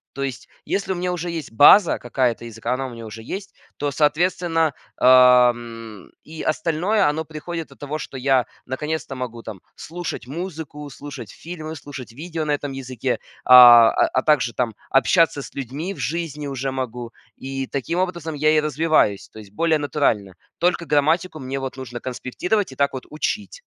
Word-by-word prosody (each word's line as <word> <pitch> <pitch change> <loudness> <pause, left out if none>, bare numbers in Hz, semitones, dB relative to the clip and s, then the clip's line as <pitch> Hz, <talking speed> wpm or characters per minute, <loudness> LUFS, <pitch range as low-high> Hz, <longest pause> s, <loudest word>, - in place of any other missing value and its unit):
То 140 - -5
есть 130 -4 -4 0.2
если 195 -1 -2
у 190 - 0
меня 180 +1 -2
уже 175 0 -3
есть 160 -8 -6
база 160 - +7
какая-то 120 -1 -1
языка, 115 +2 -4
она 135 +1 -2
у 130 - -6
меня 115 -1 -9
уже 110 +1 -9
есть, 195 - -7 0.2
то, 145 - -1
соответственно, 165 +1 +1 0.2
ам, 120 -4 +4
и 160 0 -8
остальное 175 +5 +1
оно 160 +2 -2
приходит 160 +2 -6
от - - -17
того, 145 +2 -4
что 140 - -8
я 130 -1 +2 0.2
наконец-то 150 +2 -4
могу 120 -2 -6
там 110 -4 -8 0.2
слушать 165 -7 -6
музыку, 155 -2 -6
слушать 135 -6 -9
фильмы, 160 -2 -8
слушать 135 -4 -9
видео 160 +4 -5
на 150 - -1
этом 145 -1 -2
языке, 130 -1 -3 0.3
а 120 -2 +10
а 130 - +1
также 140 -6 +2
там 115 -4 -2 0.2
общаться 145 +2 +3
с - - -10
людьми 140 +9 -5
в - - -15
жизни 150 -2 -3
уже 135 -1 -3
могу, 125 -2 -5 0.2
и 135 0 -5
таким 140 +6 -3
образом 170 -4 -2
я 155 +1 +3
и 155 - +4
развиваюсь, 150 -8 +1
то - - -12
есть 105 -2 -13
более 160 +7 +1
натурально. 115 -10 0 0.2
Только 175 0 +1
грамматику 155 +3 +1
мне 135 0 -4
вот 135 -1 -5
нужно 120 -2 -7
конспектировать 135 - -2
и - - -11
так 140 +1 +1
вот 130 - -6
учить. 210 - -4
140 Hz, 175 wpm, -22 LUFS, 125-160 Hz, 0.3 s, а